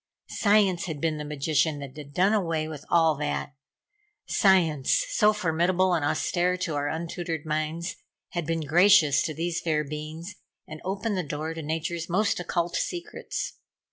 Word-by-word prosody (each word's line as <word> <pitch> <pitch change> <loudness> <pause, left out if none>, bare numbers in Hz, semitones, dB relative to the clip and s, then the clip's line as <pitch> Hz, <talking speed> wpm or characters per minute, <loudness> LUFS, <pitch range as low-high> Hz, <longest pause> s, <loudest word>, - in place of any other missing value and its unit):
Science 200 -4 +3
had 160 -4 -5
been 160 0 0
the - - -4
magician 150 +1 0
that 140 -1 -8
had 145 -2 -9
done 190 +7 +3
away 165 -6 0 0.2
all 165 -2 +4
that. 145 0 -3 0.7
Science, 165 -8 +3
so 210 0 +4
formidable 185 -1 +1
and 165 -4 +1
austere 180 +5 +1
to 180 -3 -2
our 145 0 -1
untutored 165 0 -4
minds, 155 +3 -2 0.3
had 175 -4 -4
been 165 0 0
gracious 160 -1 +5
to - - -1
these 170 +1 -2
fair 155 -2 0
beings 155 +5 -7 0.3
and 155 0 -9
opened 195 +3 -2
the - - +1
door 155 0 -4
to 165 - -6
nature's 160 +2 -3
most 200 +3 +1
occult 175 -1 -1
secrets. 355 +7 -4
165 Hz, 155 wpm, -26 LUFS, 155-180 Hz, 0.7 s, gracious